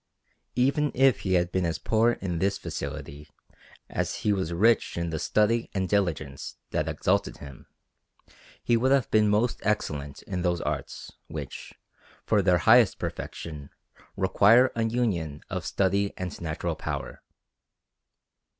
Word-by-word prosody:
Even 140 +4 +2
if 135 -1 +4
he 95 - -1
had 90 -1 +2
been 95 - 0
as 85 -1 -1
poor 115 +2 +2
in 90 -6 -4
this 100 +2 +1
facility 75 +2 -6 0.6
as - - -2
he 105 - +4
was 95 -4 -2
rich 110 +5 +2
in 85 -1 -2
the 80 - -2
study 110 +6 +1
and 95 -1 0
diligence 80 -9 -2 0.2
that - - -1
exalted - - 0
him, 70 -2 -12 1.0
he 120 - +3
would 130 +3 +2
have 135 -4 +2
been 105 -1 +4
most 110 +4 +1
excellent 75 -9 -2
in 90 -2 -4
those 85 -1 0
arts, - - -4 0.2
which, 75 -4 -7 0.5
for 105 -2 +3
their 90 -2 +4
highest 115 +2 +5
perfection, 75 -4 -6 0.5
require 105 +6 +5
a 115 -1 0
union 100 -11 -1
of - - -3
study 100 +1 +1
and 90 -1 -5
natural 80 -2 -2
power. - - -5
95 Hz, 140 wpm, -27 LUFS, 85-115 Hz, 1.0 s, highest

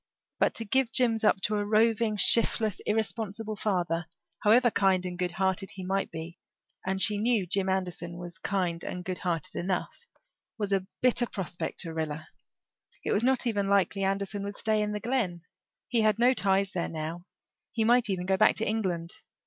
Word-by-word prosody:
But - - +2
to 225 - -2
give 260 +2 +1
Jims 230 -4 +2
up 195 -2 +3
to 210 +1 0
a 205 - 0
roving, 220 +1 +2
shiftless, 220 0 +4
irresponsible 220 0 -2
father, 175 -5 -1 0.3
however 235 +3 +4
kind 190 -3 +2
and 180 -1 -4
good 180 -1 -2
hearted 190 +1 -1
he 190 -1 -7
might 195 +1 -1
be 165 +2 -8 0.4
and 190 0 -2
she 205 +1 +2
knew 225 -3 +2
Jim 190 +2 0
Anderson 180 -2 -3
was 175 +1 -8
kind 180 -4 -1
and 180 0 -5
good 185 -1 -3
hearted 180 0 -2
enough 185 - -3 0.5
was 205 -3 -2
a 190 -1 0 0.2
bitter 245 -1 +3
prospect 180 -5 -4
to 165 -3 -5
Rilla. 155 -1 -4 0.8
It - - 0
was 210 - +2
not 260 0 +2
even 205 -4 0
likely 200 0 +2
Anderson 195 +1 -1
would 200 +1 -5
stay 215 -1 +1
in 210 0 -1
the 210 - -3
Glen; 210 -9 -2 0.4
he 235 -2 +1
had 215 -1 +3
no 245 +2 +4
ties 195 -3 +1
there 175 - -2
now; 165 +3 -6 0.4
he 225 - 0
might 240 0 +4
even 180 -2 -2
go 190 0 +1
back 215 - +5
to 225 - 0
England. 180 -6 -2
195 Hz, 185 wpm, -28 LUFS, 180-220 Hz, 0.8 s, back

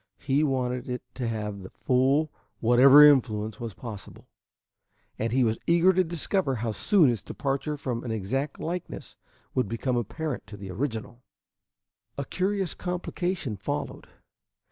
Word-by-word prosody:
He 140 +2 +1
wanted 125 -2 -1
it 125 0 -4
to 125 -3 -3
have 105 -2 -3
to - - -10
the 95 - -9
full 135 +4 +1 0.3
whatever 130 +5 +8
influence 110 -7 +3
was 115 -4 -6
possible, 110 -5 -9 0.9
and 115 0 -1
he 130 +1 +3
was 110 -1 0
eager 170 +2 +5
to 185 +1 +3
discover 170 -2 0
how 115 -1 -2
soon 155 - +4
its 115 -5 -3
departure 140 +2 -3
from 125 -4 -3
an 120 - -5
exact 130 +7 -2
likeness 175 +1 -5 0.4
would 130 -4 +1
become 120 +2 -1
apparent 130 +5 -4
to 105 - -10
the 95 -1 -8
original. 115 +2 -4 1.0
A 140 - -3
curious 190 +1 -1
complication 180 - -3
followed. 95 - -4
130 Hz, 145 wpm, -27 LUFS, 115-150 Hz, 1.0 s, whatever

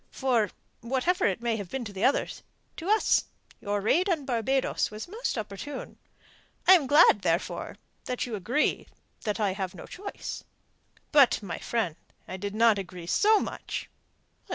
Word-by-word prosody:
For, 240 -6 +1 0.3
whatever 265 +10 +1
it 195 +3 -1
may 230 -2 0
have 200 -4 -6
been 265 +2 -4
to 200 -2 -7
others, 270 - +1 0.4
to 345 +3 -5
us 435 +1 +3 0.3
your 205 0 -2
raid 335 - +2
upon 325 -7 0
Barbados 260 +2 0
was 215 +6 -7
most 440 - -3
opportune. 220 +7 -6 0.7
I 375 - +10
am 320 -8 +4
glad, 290 - +6
therefore, 170 0 -1 0.3
that 250 -1 -2
you 240 - -7
agree 230 +9 0 0.3
the 210 0 -2
I 200 -3 +1
have 190 -1 -4
no 170 - -9
choice." 400 +2 -7 0.7
"But, 280 -7 +5
my 175 -5 -5
friend, 210 -9 -2 0.3
I 185 - -5
did 200 +2 -5
not 225 -2 +4
agree 180 -2 -7
so 425 - +4
much." - - -5
230 Hz, 155 wpm, -28 LUFS, 200-285 Hz, 0.7 s, I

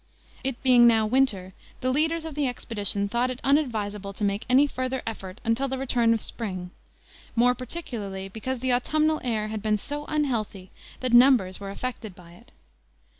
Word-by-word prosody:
It 265 -2 -3
being 245 -2 +7
now 225 -2 +4
winter, 215 -6 +1 0.3
the 255 - +1
leaders 320 +4 0
of 320 - -5
the 290 -1 0
expedition 205 -5 0
thought 240 +4 0
it 255 0 -5
unadvisable 215 -8 0
to 210 - -6
make 200 +1 -1
any 265 +3 +6
further 255 -2 -3
effort 195 -2 -6
until 230 +4 +1
the 265 0 -3
return 245 -3 +1
of 225 - -4
spring, 185 -6 -5 0.6
more 245 +1 +4
particularly 230 - -6
because 235 +5 -5
the 260 -1 +1
autumnal 310 +5 +1
air 220 -4 -1
had 215 -1 -4
been 215 0 +1
so 290 +7 -6
unhealthy 230 -11 -2 0.3
that 255 -2 -1
numbers 240 -7 +5
were 200 -1 -6
affected 220 -2 -6
by 170 -1 -15
it. 175 - -18
240 Hz, 175 wpm, -26 LUFS, 205-260 Hz, 0.6 s, being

